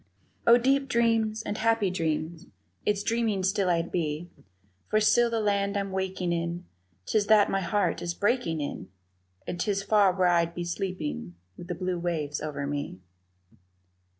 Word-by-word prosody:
Oh, 235 Hz, +1 st, +8 dB
deep 270 Hz, +2 st, +1 dB
dreams 225 Hz, -2 st, +1 dB
and 210 Hz, -, -4 dB
happy 225 Hz, -3 st, +2 dB
dreams, 160 Hz, -1 st, -2 dB, 0.4 s
Its 205 Hz, -1 st, +1 dB
dreaming 225 Hz, -4 st, 0 dB
still 195 Hz, 0 st, +1 dB
I'd 170 Hz, -1 st, 0 dB
be, 165 Hz, 0 st, -2 dB, 0.6 s
For 215 Hz, -, +3 dB
still 235 Hz, +3 st, +4 dB
the 230 Hz, -1 st, -1 dB
land 200 Hz, -1 st, 0 dB
I'm 200 Hz, -1 st, -2 dB
waking 190 Hz, -2 st, -2 dB
in, 170 Hz, +1 st, -3 dB, 0.4 s
'Tis 205 Hz, -, +1 dB
that 215 Hz, -2 st, +5 dB
my 195 Hz, -, +1 dB
heart 200 Hz, +3 st, 0 dB
is 170 Hz, 0 st, -3 dB
breaking 200 Hz, -, 0 dB
in, 145 Hz, -, -5 dB, 0.6 s
And 175 Hz, -, -5 dB
'tis 200 Hz, -1 st, 0 dB
far 205 Hz, -2 st, +4 dB
where 185 Hz, 0 st, +2 dB
I'd 170 Hz, -1 st, +2 dB
be 175 Hz, -, -3 dB
sleeping 170 Hz, -, -4 dB, 0.2 s
with 175 Hz, -, -10 dB
the 175 Hz, -, -3 dB
blue 180 Hz, 0 st, -2 dB
waves 160 Hz, -4 st, -2 dB
over 145 Hz, -2 st, -4 dB
me. 145 Hz, -6 st, -4 dB
190 Hz, 160 wpm, -27 LUFS, 170-215 Hz, 0.6 s, Oh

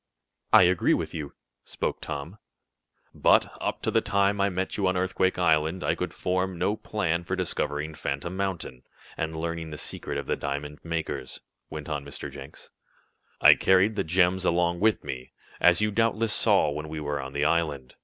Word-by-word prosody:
"I -, -, +8 dB
agree 90 Hz, 0 st, +3 dB
with -, -, -4 dB
you," 75 Hz, -3 st, -6 dB, 0.3 s
spoke -, -, -3 dB
Tom. 80 Hz, +9 st, -6 dB, 0.7 s
"But, -, -, +3 dB
up -, -, -3 dB
to -, -, 0 dB
the -, -, +3 dB
time 100 Hz, 0 st, +1 dB
I 100 Hz, -, +3 dB
met 95 Hz, 0 st, -3 dB
you 100 Hz, -2 st, +1 dB
on 95 Hz, 0 st, +1 dB
Earthquake 95 Hz, 0 st, +1 dB
Island, 80 Hz, 0 st, +2 dB
I -, -, +2 dB
could -, -, -3 dB
form 95 Hz, 0 st, -1 dB
no 105 Hz, +5 st, +1 dB
plan 90 Hz, -6 st, -2 dB
for 90 Hz, +2 st, -2 dB
discovering 75 Hz, -4 st, -2 dB
Phantom 75 Hz, +4 st, -4 dB
Mountain, 95 Hz, -10 st, -3 dB, 0.3 s
and 80 Hz, 0 st, -3 dB
learning 85 Hz, 0 st, -3 dB
the 75 Hz, -, -7 dB
secret -, -, -4 dB
of -, -, -4 dB
the -, -, 0 dB
diamond 75 Hz, +1 st, -4 dB
makers," 80 Hz, -6 st, -4 dB, 0.3 s
went 75 Hz, -1 st, -7 dB
on 75 Hz, -2 st, -3 dB
Mr. 70 Hz, -1 st, -7 dB
Jenks. 70 Hz, 0 st, -11 dB, 0.7 s
"I -, -, +9 dB
carried 95 Hz, +3 st, +3 dB
the 100 Hz, -, 0 dB
gems 90 Hz, +2 st, +2 dB
about 85 Hz, -1 st, +1 dB
with 110 Hz, +2 st, +2 dB
me, 65 Hz, -1 st, -7 dB, 0.3 s
as 90 Hz, +2 st, +5 dB
you 105 Hz, 0 st, +2 dB
doubtless 115 Hz, 0 st, +1 dB
saw 75 Hz, -, +3 dB
when 75 Hz, +1 st, -5 dB
we 80 Hz, 0 st, -5 dB
were 75 Hz, -1 st, -2 dB
on 65 Hz, 0 st, -8 dB
the 70 Hz, +1 st, 0 dB
island. 75 Hz, -5 st, 0 dB
85 Hz, 185 wpm, -27 LUFS, 75-95 Hz, 0.7 s, I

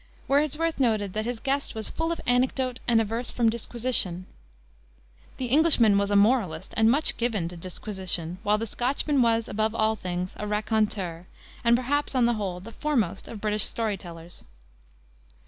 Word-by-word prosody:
Wordsworth 305 Hz, +3 st, +1 dB
noted 215 Hz, -6 st, +1 dB
that 215 Hz, 0 st, -2 dB
his 240 Hz, -1 st, -3 dB
guest 275 Hz, +1 st, -1 dB
was 220 Hz, -1 st, -3 dB
"full 325 Hz, +1 st, -2 dB
of 335 Hz, -, -3 dB
anecdote 255 Hz, 0 st, +1 dB
and 235 Hz, -2 st, +4 dB
averse 225 Hz, +2 st, -2 dB
from 230 Hz, -2 st, +1 dB
disquisition." 230 Hz, -6 st, -1 dB, 1.1 s
The 260 Hz, -, -2 dB
Englishman 255 Hz, -5 st, +5 dB
was 200 Hz, 0 st, 0 dB
a 205 Hz, -, +1 dB
moralist 200 Hz, -6 st, +2 dB
and 220 Hz, 0 st, +4 dB
much 290 Hz, +6 st, +4 dB
given 225 Hz, -8 st, -1 dB
to 175 Hz, -, -10 dB
"disquisition," 180 Hz, -1 st, -4 dB
while 210 Hz, +1 st, +2 dB
the 225 Hz, -, -3 dB
Scotchman 265 Hz, +5 st, 0 dB
was, 230 Hz, -1 st, +2 dB
above 220 Hz, +2 st, -1 dB
all 220 Hz, 0 st, +2 dB
things, 180 Hz, -2 st, -4 dB
a 210 Hz, -, -4 dB
raconteur, 210 Hz, -5 st, -1 dB, 0.4 s
and, 235 Hz, 0 st, +5 dB
perhaps, 275 Hz, +3 st, -1 dB
on 250 Hz, -2 st, +4 dB
the 240 Hz, -, +2 dB
whole, 195 Hz, -5 st, -3 dB
the 210 Hz, +5 st, -11 dB
foremost 230 Hz, -, -1 dB
of 225 Hz, -, -8 dB
British 210 Hz, -1 st, +4 dB
story 220 Hz, -3 st, -1 dB
tellers. 170 Hz, -2 st, -10 dB
220 Hz, 165 wpm, -26 LUFS, 200-250 Hz, 1.1 s, Englishman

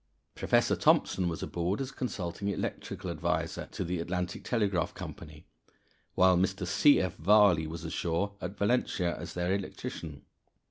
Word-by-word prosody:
Professor -, -, +2 dB
Thomson 90 Hz, -2 st, +3 dB
was 80 Hz, -, -4 dB
aboard 90 Hz, +3 st, -2 dB
as 135 Hz, -1 st, -3 dB
consulting 100 Hz, -7 st, -4 dB
electrical 100 Hz, -, -3 dB
adviser -, -, -2 dB
to -, -, -4 dB
the 90 Hz, +1 st, -2 dB
Atlantic 90 Hz, +1 st, -3 dB
Telegraph 100 Hz, -8 st, 0 dB
Company, 75 Hz, +2 st, -9 dB, 0.7 s
while 95 Hz, 0 st, +5 dB
Mr. 95 Hz, +1 st, 0 dB
C. 100 Hz, +11 st, +5 dB
F. 95 Hz, -3 st, -1 dB
Varley 95 Hz, -3 st, +5 dB
was 80 Hz, +1 st, -7 dB
ashore 85 Hz, +5 st, -1 dB
at 95 Hz, +3 st, -5 dB
Valentia 100 Hz, -5 st, +1 dB
as 85 Hz, -, -8 dB
their 90 Hz, +1 st, 0 dB
electrician. 85 Hz, -6 st, -5 dB
90 Hz, 140 wpm, -30 LUFS, 85-100 Hz, 0.7 s, while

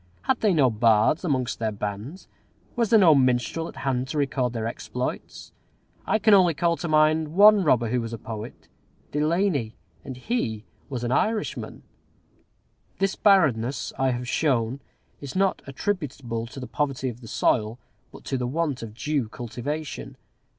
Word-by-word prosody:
Had 260 Hz, -2 st, +1 dB
they 215 Hz, -, +3 dB
no 140 Hz, -8 st, +3 dB
bards 110 Hz, -, +3 dB
amongst 130 Hz, -7 st, -1 dB
their 110 Hz, -1 st, -1 dB
bands? 105 Hz, -, -6 dB, 0.5 s
Was 235 Hz, -3 st, +1 dB
there 225 Hz, -, +6 dB
no 180 Hz, -6 st, +7 dB
minstrel 130 Hz, +4 st, +1 dB
at -, -, -10 dB
hand 130 Hz, -1 st, -2 dB
to 150 Hz, -, -4 dB
record 135 Hz, -3 st, 0 dB
their 115 Hz, -2 st, -4 dB
exploits? 115 Hz, -, -5 dB, 0.6 s
I -, -, +3 dB
can 215 Hz, 0 st, +4 dB
only 180 Hz, -5 st, +5 dB
call 170 Hz, +1 st, +1 dB
to 175 Hz, -, -4 dB
mind 155 Hz, 0 st, +2 dB
one 205 Hz, 0 st, +7 dB
robber 120 Hz, -7 st, +2 dB
who 125 Hz, +1 st, 0 dB
was 115 Hz, 0 st, -5 dB
a 115 Hz, -, -5 dB
poet, 110 Hz, +1 st, -8 dB, 0.4 s
Delany, 150 Hz, -, 0 dB, 0.3 s
and 130 Hz, -2 st, -7 dB
he 125 Hz, -, -2 dB, 0.3 s
was 125 Hz, -3 st, -4 dB
an 120 Hz, -, -1 dB
Irishman. 215 Hz, -, -1 dB, 1.1 s
This 195 Hz, 0 st, 0 dB
barrenness, 140 Hz, -, +2 dB
I 135 Hz, 0 st, +1 dB
have 125 Hz, 0 st, -3 dB
shown, 130 Hz, -3 st, 0 dB, 0.4 s
is 140 Hz, +2 st, -8 dB
not 195 Hz, 0 st, +1 dB
attributable 135 Hz, -, -3 dB
to 130 Hz, -, -10 dB
the 130 Hz, -, -6 dB
poverty 135 Hz, -1 st, -2 dB
of 120 Hz, 0 st, -6 dB
the 115 Hz, -, -11 dB
soil, 110 Hz, +1 st, 0 dB, 0.3 s
but -, -, -13 dB
to 135 Hz, -, -2 dB
the 125 Hz, -, -1 dB
want 150 Hz, -1 st, -2 dB
of 110 Hz, -2 st, -8 dB
due 140 Hz, -2 st, -1 dB
cultivation. 125 Hz, +7 st, -6 dB
135 Hz, 165 wpm, -25 LUFS, 120-165 Hz, 1.1 s, no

